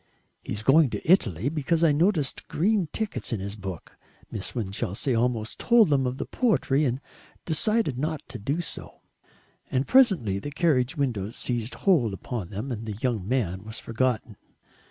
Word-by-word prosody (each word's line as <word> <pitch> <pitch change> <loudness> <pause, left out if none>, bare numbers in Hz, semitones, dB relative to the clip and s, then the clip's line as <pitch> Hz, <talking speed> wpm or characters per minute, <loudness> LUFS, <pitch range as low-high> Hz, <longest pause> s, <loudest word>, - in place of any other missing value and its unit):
"He's 105 +1 -4
going 140 +3 +5
to - - -6
Italy, 115 - +3
because 160 +2 0
I 165 - +6
noticed 155 -2 +1
green 195 +2 +1
tickets 220 -9 -3
in 115 - -1
his 100 +2 -5
book." 95 -5 -8 0.3
Miss 105 +2 -4
Winchelsea 105 +2 -2
almost 115 -1 -1
told 235 -6 +5
them 135 -3 +2
of 125 +1 -3
the - - -3
poetry, 155 - +1
and 125 0 0 0.5
decided 175 - +1
not 155 +1 -2
to - - -7
do 140 +11 -1
so. 170 - -9 0.7
And 130 +2 0
presently 185 - +4
the 145 - -5
carriage 145 -5 +1
windows 115 -7 -1
seized 120 -1 -2
hold 145 - +2
upon 100 -2 -5
them 105 +7 -5
and 115 -1 -5
the 105 - -3
young 110 -3 -2
man 100 -7 -1
was 110 +1 -7
forgotten. 115 -2 -1
130 Hz, 165 wpm, -26 LUFS, 110-155 Hz, 0.7 s, I